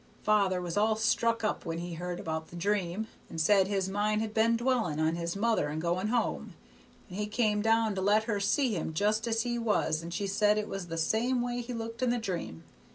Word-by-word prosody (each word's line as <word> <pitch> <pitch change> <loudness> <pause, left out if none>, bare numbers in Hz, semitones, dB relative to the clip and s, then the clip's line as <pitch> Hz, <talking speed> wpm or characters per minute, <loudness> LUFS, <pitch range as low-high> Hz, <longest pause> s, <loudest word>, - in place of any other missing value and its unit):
Father 200 -3 +3
was 175 +1 -4
all 215 +1 +3
struck 230 +1 +1
up 215 - -1
when 165 0 -3
he 175 0 -5
heard 175 +1 -4
about 160 0 -4
the - - -12
dream, 195 +2 -1 0.2
and 165 - -6
said 190 +3 +4
his 195 -2 0
mind 210 +2 0
had 220 -1 -3
been 230 +1 +3
dwellin' 235 - 0
on 160 +1 +2
his 170 +1 -3
mother 220 -5 +1
and 150 +2 -3
going 175 +4 0
home, 235 +1 -1 0.5
and 190 0 -7
he 210 - -1
come 210 -1 +1
down 225 0 +2
to 190 - -3
let 205 +3 +3
her 215 -3 -1
see 230 +5 +1
him 160 -2 -3
just 215 +5 +1
as 225 0 +1
he 240 -1 -2
was 205 -8 +1
and 170 +1 -7
she 200 +4 -2
said 210 +2 +2
it 210 0 -1
was 195 -2 -5
the 165 -1 -5
same 240 +8 +1
way 245 0 -2
he 240 +1 -7
looked 230 +1 -6
in 255 - +2
the 245 - +1
dream. 175 - -4
210 Hz, 230 wpm, -30 LUFS, 175-225 Hz, 0.5 s, said